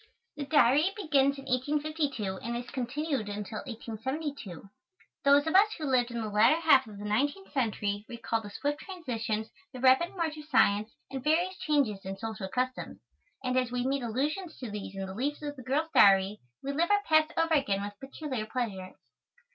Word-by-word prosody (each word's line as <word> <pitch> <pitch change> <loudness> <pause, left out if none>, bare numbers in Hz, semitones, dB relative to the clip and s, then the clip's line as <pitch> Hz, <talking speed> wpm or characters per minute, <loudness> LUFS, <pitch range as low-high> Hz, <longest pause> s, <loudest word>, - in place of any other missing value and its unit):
The 290 - -4
Diary 295 +4 +4
begins 280 -8 +2
in 275 - -9
1852, 280 -5 -1
and 235 +1 -3
is 245 0 -7
continued 260 -2 -2
until 210 +1 -5
1872. 235 - -5 0.6
Those 280 +1 +5
of 320 - -1
us 415 +3 +6
who 315 - -4
lived 250 -3 +2
in 235 -1 -4
the 220 - -3
latter 220 +9 +4
half 275 -7 +5
of 210 -2 -10
the 205 - -7
nineteenth 285 - -1
century 210 -6 -1
recall 230 -1 -2
the 205 - -8
swift 290 +7 -2
transitions, 230 - -4 0.2
the 255 - -8
rapid 260 +8 +4
march 325 -4 -2
of 300 - -9
science 215 -7 +3 0.2
and 265 -2 -5
various 345 +5 +2
changes 270 -10 +1
in 195 0 -5
social 220 -2 -5
customs, 255 +3 -2 0.5
and 255 0 0
as 255 -2 +1
we 250 0 -1
meet 275 +1 0
allusions 295 - -2
to 245 -5 -6
these 200 -2 -6
in 195 0 -3
the 190 - -7
leaves 285 +8 -2
of 290 -1 -4
the 260 - -10
girl's 295 +6 -1
Diary 195 +1 +5 0.2
we 275 - -2
live 325 +5 +1
our 410 0 +3
past 315 -2 +3
over 330 0 +2
again 200 -10 +1
with 205 0 -5
peculiar 270 -4 -5
pleasure. 205 -6 -4
260 Hz, 185 wpm, -30 LUFS, 220-300 Hz, 0.6 s, us